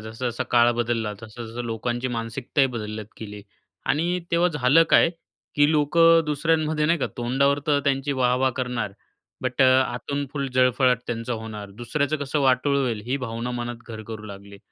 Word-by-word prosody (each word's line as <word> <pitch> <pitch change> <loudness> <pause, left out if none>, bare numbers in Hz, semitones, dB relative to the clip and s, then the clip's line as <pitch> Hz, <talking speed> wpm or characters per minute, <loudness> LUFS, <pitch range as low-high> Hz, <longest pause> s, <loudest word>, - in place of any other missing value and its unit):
जसा-जसा 120 +2 -3
काळ 120 0 +5
बदलला 115 -2 -1
तसं-तसं 115 +2 -7
लोकांची 120 +2 -2
मानसिकताही 120 +4 -1
बदलत 105 -1 -5
गेली. 105 -1 -8 0.4
आणि 170 +5 +1
तेव्हा 170 +1 +3
झालं 135 +5 +5
काय - - +6 0.4
की 145 +1 +4
लोकं 165 +2 +4
दुसऱ्यांमध्ये 155 0 +1
नाही 170 +2 +2
का - - 0
तोंडावर 135 +3 +1
तर 145 -1 +3
त्यांची 140 0 0
वाह-वाह 130 0 +2
करणार, 125 -6 -2 0.5
बट 130 +1 +1
अ, - - +7 0.2
आतून 140 +4 -4
फुल 140 -2 -2
जळफळाट 125 -1 +3
त्यांचा 115 +1 -3
होणार. 110 -3 -6
दुसऱ्याचं 140 +8 -2
कसं 145 0 -2
वाटोळ 135 +1 +2
होईल 120 -6 -1
ही 130 +3 0
भावना 115 +2 -4
मनात 120 -1 -4
घर 110 -1 -7
करू 110 -1 -7
लागली 100 0 -11
125 Hz, 160 wpm, -24 LUFS, 115-145 Hz, 0.5 s, अ